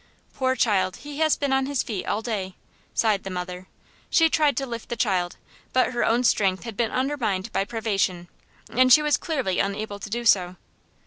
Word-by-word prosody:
"Poor 260 -1 0
child! 195 -6 +1
He 290 0 -9
has 315 -1 +3
been 280 -2 -1
on 265 0 +1
his 280 -2 0
feet 210 -5 -5
all 220 - -1
day," 195 -5 -3 0.4
sighed 215 -4 +2
the 195 - -5
mother. 180 0 -6 0.4
She 325 -1 +4
tried 300 -2 +2
to 275 - 0
lift 235 -3 -7
the 240 - -2
child, 185 -6 0 0.4
but 255 0 +2
her 240 - 0
own 235 +2 +2
strength 195 -5 +2
had 230 -3 -7
been 230 +1 0
undermined 245 -9 -1
by 195 - +1
privation, 200 -6 -1 0.4
and 255 +2 +3
she 300 +3 +8
was 300 -1 +3
clearly 265 - -2
unable 205 +1 -2
to 200 - -7
do 235 +3 -3
so. 185 -5 +3
225 Hz, 195 wpm, -24 LUFS, 195-260 Hz, 0.4 s, she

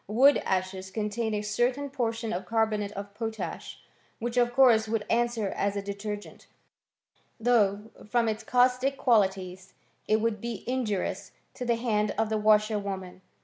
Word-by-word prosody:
Wood 260 +8 +5
ashes 185 0 -2
contain 215 +2 -2
a 210 - -2
certain 245 +6 0
portion 230 -3 -2
of 180 +1 -4
carbonate 215 -2 0
of 200 0 -7
potash, 220 -5 -5 0.4
which 235 +1 -4
of 240 -1 +3
course 240 -4 +5
would 220 -1 -1
answer 235 -3 +1
as 200 +1 -1
a 200 - -1
detergent; 205 +1 -6 0.9
though, 220 -2 +2 0.2
from 235 0 +2
its 220 0 -2
caustic 250 +3 +2
qualities, 190 -5 +1 0.3
it 215 +1 +3
would 220 -2 -1
be 235 -4 -5
injurious 210 -6 -2 0.2
to 250 - -6
the 235 -1 +2
hands 215 -3 0
of 220 0 +1
the 220 - 0
| - - -2
washerwomen. 205 -3 +1
215 Hz, 150 wpm, -28 LUFS, 200-235 Hz, 0.9 s, Wood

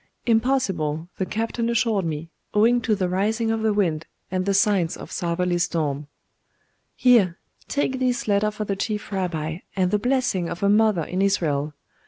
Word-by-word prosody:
'Impossible, 200 - +1
the 190 - -1
captain 230 +1 -2
assured 220 -5 +1
me, 160 +1 -4 0.2
owing 235 +3 +4
to 220 -2 +1
the 190 -2 0
rising 220 +5 0
of 225 0 -1
the 220 0 +2
wind, 170 -7 0 0.2
and 185 0 -1
the 200 - +2
signs 195 -5 +2
of - - -10
southerly 175 0 -1
storm.' 150 -5 -1 0.9
'Here, 215 -9 +4 0.3
take 265 -2 -1
this 250 -3 0
letter 205 +1 +2
for 215 0 -5
the 200 - -1
Chief 210 +2 -3
Rabbi, 165 -4 -2 0.2
and 185 -2 +1
the 210 - +2
blessing 245 -7 0
of 175 +3 -5
a 200 - +4
mother 210 -4 +3
in 185 +5 -2
Israel. 155 -7 0
200 Hz, 170 wpm, -24 LUFS, 170-225 Hz, 0.9 s, owing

